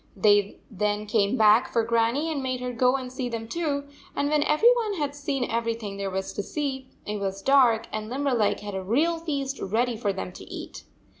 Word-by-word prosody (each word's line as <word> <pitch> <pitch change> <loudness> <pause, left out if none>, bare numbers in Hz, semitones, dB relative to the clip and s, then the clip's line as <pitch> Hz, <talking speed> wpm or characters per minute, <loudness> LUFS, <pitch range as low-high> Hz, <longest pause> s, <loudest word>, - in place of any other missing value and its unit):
Then 205 0 +3 0.2
they 210 +1 -1
came 210 +2 +1
back 220 +4 +5
for 230 - +2
Grannie 235 +7 +1
and 290 -3 -2
made 255 -1 -2
her 250 0 -4
go 250 +2 +3
and 255 -2 -5
see 255 -1 -3
them 225 -1 -5
too, 290 0 -1 0.3
and 285 0 0
when 300 -1 +3
every 305 +12 +5
one 440 -4 -1
had 290 -4 -2
seen 280 -2 -2
everything 230 -4 -2
there 200 -1 -2
was 190 0 -3
to - - -2
see, 265 +3 -3 0.2
it 210 0 -3
was 195 0 -3
dark, 255 -5 +4
and 215 0 -4
Limberleg 255 -5 +1
had 205 -1 -6
a 190 - -3
real 300 - +1
feast 280 -4 -3
ready 235 +5 0
for 215 -2 -1
them 95 - -5
to - - -11
eat. - - -8
240 Hz, 210 wpm, -26 LUFS, 210-280 Hz, 0.3 s, back